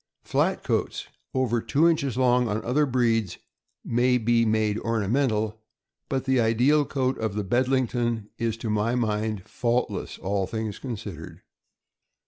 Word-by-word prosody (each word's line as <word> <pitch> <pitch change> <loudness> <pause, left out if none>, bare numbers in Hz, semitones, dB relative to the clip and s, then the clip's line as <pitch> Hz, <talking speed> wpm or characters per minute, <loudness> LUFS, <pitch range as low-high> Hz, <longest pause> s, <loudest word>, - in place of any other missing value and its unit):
Flat - - 0
coats, - - -2 0.3
over 120 -3 +1
two 150 +8 +3
inches 140 -7 +1
long, 125 -1 +3
on 105 +1 -2
other 145 +5 +2
breeds 115 -7 +1 0.5
may 125 +2 +2
be 115 0 +2
made 110 -1 +1
ornamental; 110 -1 0 0.5
but 130 -1 -1
the 130 -1 +2
ideal 125 +6 +3
coat 130 -2 -1
of 110 -3 -2
the 105 - -1
Bedling 130 +5 +2
ton 115 -3 -2
is, 115 -1 -1
to 115 -1 -3
my 105 +3 +1
mind, 110 -4 -1
faultless, 120 +1 -1
all 95 0 -1
things 110 -2 -4
considered. 100 - -7
115 Hz, 140 wpm, -26 LUFS, 110-130 Hz, 0.5 s, two